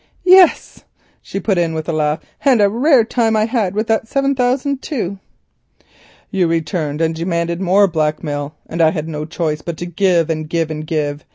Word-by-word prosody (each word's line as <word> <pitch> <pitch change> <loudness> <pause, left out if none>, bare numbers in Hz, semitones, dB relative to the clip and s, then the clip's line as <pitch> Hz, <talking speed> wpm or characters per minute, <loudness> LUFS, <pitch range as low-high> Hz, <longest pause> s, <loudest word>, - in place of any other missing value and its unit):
"Yes," 370 -1 +4 0.4
she 195 - -5
put 195 -2 0
in 165 -2 0
with 160 0 -4
a 170 - -1
laugh, 155 0 0 0.2
"and 265 -5 +4
a 200 -1 +4
rare 255 +2 +4
time 225 -1 0
I 215 0 +2
had 220 -5 -1
with 215 +2 0
that 225 0 0
seven 275 +2 0
thousand 265 +2 0
too." 200 - -4 1.1
"You 190 -4 +1
returned 165 -2 -2
and 165 0 +1
demanded 170 +1 -2
more 195 +2 +4
blackmail, 150 -3 -2
and 165 - -3
I 160 - +5
had 155 -2 -4
no 150 -1 -5
choice 155 -2 -3
but 170 -1 -6
to 175 - -5
give, 175 -2 +1
and 155 -1 -4
give, 165 -1 -1
and 155 0 -6
give. 150 -2 -2
170 Hz, 190 wpm, -17 LUFS, 155-220 Hz, 1.1 s, I